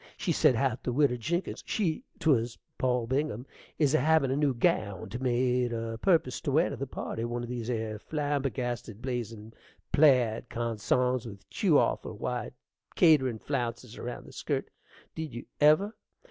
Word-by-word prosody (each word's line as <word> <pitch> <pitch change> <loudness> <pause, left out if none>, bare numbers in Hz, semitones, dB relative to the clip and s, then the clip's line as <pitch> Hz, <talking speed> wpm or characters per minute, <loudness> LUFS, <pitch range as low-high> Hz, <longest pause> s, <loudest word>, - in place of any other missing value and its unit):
She - - -1
said 125 - +4
how't 125 0 0
the 125 - -2
widder 135 -1 +3
Jinkins 170 - -2
(she 195 +1 0
'twas 125 -8 +2 0.2
Poll 125 -2 +1
Bingham) 130 -1 -1 0.3
is 145 -2 +3
a 155 - +5
havin' 155 -1 +3
a - - +1
new 145 -1 +2
gownd 115 - 0
made 125 -1 +1
a 115 -1 -4
purpose 160 -7 +2
to 140 - -1
wear 160 +5 +3
to - - -3
the 135 +2 -4
party, 115 -2 -4
one 120 +1 -3
of 120 - -6
these 120 -1 -4
'ere 110 -3 -2
flambergasted, 130 -7 -2
blazin' 115 -3 -5 0.4
plaid 125 -6 +4
consarns, 120 +2 0
with 100 -3 -11
tew - - +3
awful - - 0
wide - - -3 0.4
kaiterin' 130 -8 +5
flounces 120 -3 -3
around 120 0 -6
the - - -13
skirt. - - -3 0.4
Did 160 -5 -5
you 120 - -6
ever! 155 +9 +5
125 Hz, 160 wpm, -29 LUFS, 115-145 Hz, 0.4 s, a